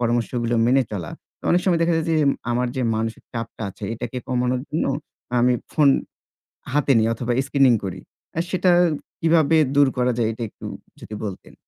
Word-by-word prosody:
পরামর্শগুলো 120 0 0
মেনে 130 +2 +4
চলা। 85 -7 -4 0.3
তো - - -63
অনেক 175 - +4
সময় 175 -3 +3
দেখা 170 0 +2
যায় 160 - -1
যে, 160 - +3 0.3
আমার 125 +1 +1
যে 130 - 0
মানসিক 115 0 -3
চাপটা 115 -1 -5
আছে 100 - -9
এটাকে 120 +2 -6
কমানোর 125 0 0
জন্য 155 - -1 0.5
আমি 125 +1 +4 0.2
ফোন 150 -2 +4 0.8
হাতে 145 -1 +3
নিই 110 0 +2
অথবা 120 +1 -2
screening 135 -4 +4
করি। 95 -1 -5 0.4
আ - - -1
সেটা 185 -1 +2 0.5
কিভাবে 160 -1 +4 0.2
দূর 145 -1 +5
করা 125 0 +2
যায়? 110 -2 +2
এটা 115 - -7
একটু - - -15 0.4
যদি 105 - -8
বলতেন। 100 -3 -7
125 Hz, 175 wpm, -22 LUFS, 115-145 Hz, 0.8 s, দূর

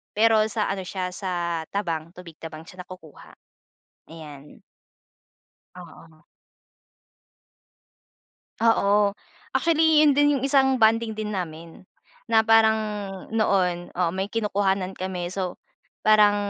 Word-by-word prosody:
pero 220 0 +4
sa 215 -2 -1
ano 195 -1 -4
siya 185 0 -4
sa 175 -4 -3
tabang 170 -5 -3
tubig 170 -3 -12
tabang 160 -1 -9
siya 180 +1 -10
nakukuha, 175 -5 -14 0.8
ayan. 150 -3 -12 1.2
Oo. 165 -2 -14 2.4
Oo, 205 -3 +2 0.4
actually 320 -2 +4
yun 295 - +5
din 290 +1 +3
yung 270 - -3
isang 265 -1 +3
bonding 225 0 +3
din 215 0 -4
namin 170 -2 -7 0.4
na 220 -1 +4
parang 220 0 +5 0.6
noon, 185 -5 0
oo, 175 -2 0
may 190 +2 -3
kinukuhanan 200 -3 -1
kami. 180 -1 -4
So, 185 -2 -4 0.5
parang 210 -1 +5
195 Hz, 110 wpm, -24 LUFS, 175-220 Hz, 2.4 s, yun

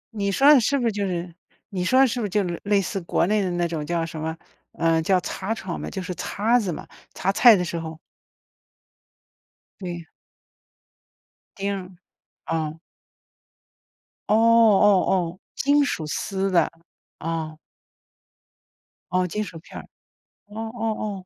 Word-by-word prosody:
你 200 -1 0
说 275 +9 +6
的 275 - +7
是 280 +5 +1
不 245 - -1
是 230 - +2
就 200 -1 -2
是 175 -1 -4 0.4
你 185 -3 -3
说 255 +8 +4
的 270 - +6
是 245 +1 -2
不 225 - -1
是 - - -9
就 205 +1 +1 0.2
类 205 0 +3
似 195 +1 -3
国 170 0 +1
内 210 +3 +2
的 185 - -1
那 175 0 0
种 165 -3 -4
叫 170 +1 -1
什 155 -1 -7
么， 160 +1 -3 0.4
呃， 165 -1 +2
叫 185 +3 +2
擦 200 +5 -3
床 190 -5 -5
嘛， - - -5
就 190 - -5
是 180 - -4
擦 215 +7 +1
子 195 -5 -2
嘛， - - -7 0.3
擦 190 - 0
菜 235 +2 +7
的 180 -2 -1
时 170 -1 -3
候 160 -1 -7 1.8
对。 175 -2 -5 1.5
丁 200 0 -2
儿。 185 -1 -10 0.5
哦。 160 -1 -2 1.5
哦 - - +4
哦 220 -4 +5
哦， 180 -1 0 0.2
金 285 +1 +3
属 170 - -2
丝 195 +5 -2
的， 170 -3 +3 0.5
哦。 160 -1 -4 1.5
哦， 185 0 +1
金 210 +4 -2
属 165 -5 -9
片 - - -12
儿， - - -12 0.6
哦 210 +2 -8
哦 215 -4 -3
190 Hz, 165 characters per minute, -24 LUFS, 170-215 Hz, 1.8 s, 的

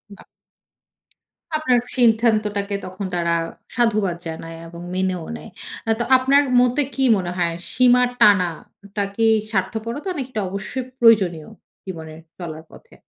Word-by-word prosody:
বা। - - -16 1.3
আপনার 255 -6 +2 0.2
সিদ্ধান্তটাকে 215 -4 +2
তখন 185 +2 -6
তারা 170 -1 0 0.4
সাধুবাদ 215 -7 +1
জানায় 165 0 -7
এবং 170 +1 -10
মেনেও 185 -3 -1
নেয়। - - -11 0.4
আ - - -1
তো - - +1
আপনার 275 +3 +4 0.2
মতে 250 +3 +2
কি 270 - 0
মনে 180 -2 -3
হয়? 170 -1 0 0.2
সীমা 250 +1 +5 0.2
টানাটা 200 +1 +1
কি 225 - 0 0.3
স্বার্থপরতা 230 - -2
নাকি, 265 -2 -4
এটা 220 - -2
অবশ্যই 200 +7 -4 0.2
প্রয়োজনীয় 195 -9 +4 0.4
জীবনের 160 -3 -8 0.2
চলার 160 -3 -7
পথে? - - -17
200 Hz, 130 wpm, -21 LUFS, 175-240 Hz, 1.3 s, সীমা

